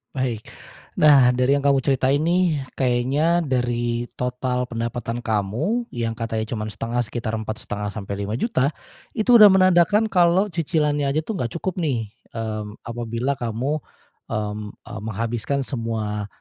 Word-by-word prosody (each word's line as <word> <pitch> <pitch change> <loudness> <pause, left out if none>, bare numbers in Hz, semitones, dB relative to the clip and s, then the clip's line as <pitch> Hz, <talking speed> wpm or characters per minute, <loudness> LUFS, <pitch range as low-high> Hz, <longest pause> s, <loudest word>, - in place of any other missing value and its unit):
Baik. 125 -5 -2 0.6
Nah, 140 -5 +7
dari 125 +3 +2
yang 140 - -1
kamu 140 -1 +4
ceritain 135 +1 +2
nih, 165 -4 +1
kayaknya 135 +7 +2
dari 120 -4 -1
total 125 0 -1
pendapatan 115 0 -4
kamu, 120 - -1
yang 115 -1 -3
katanya 115 -1 -2
cuman 110 -2 -3
1/2 115 +4 -3
sekitar 120 -1 -2
Rp4.500.000-Rp5.000.000, 110 - -2 0.4
itu 235 +2 +5
udah 210 - +11
menandakan 190 +3 +4
kalau 180 +2 +3
cicilannya 150 -3 0
aja 155 +3 0
tuh 210 -1 -4
nggak 120 +6 -3
cukup 185 +2 -3
nih. 120 -10 -1 0.2
Mmm, 110 -2 -4
apabila 120 +3 -3
kamu, 125 +6 -1 0.5
mmm, 105 0 -3 0.2
eee, - - -7
menghabiskan 115 +5 -2
semua, 110 -5 -3
125 Hz, 130 wpm, -23 LUFS, 115-150 Hz, 0.6 s, udah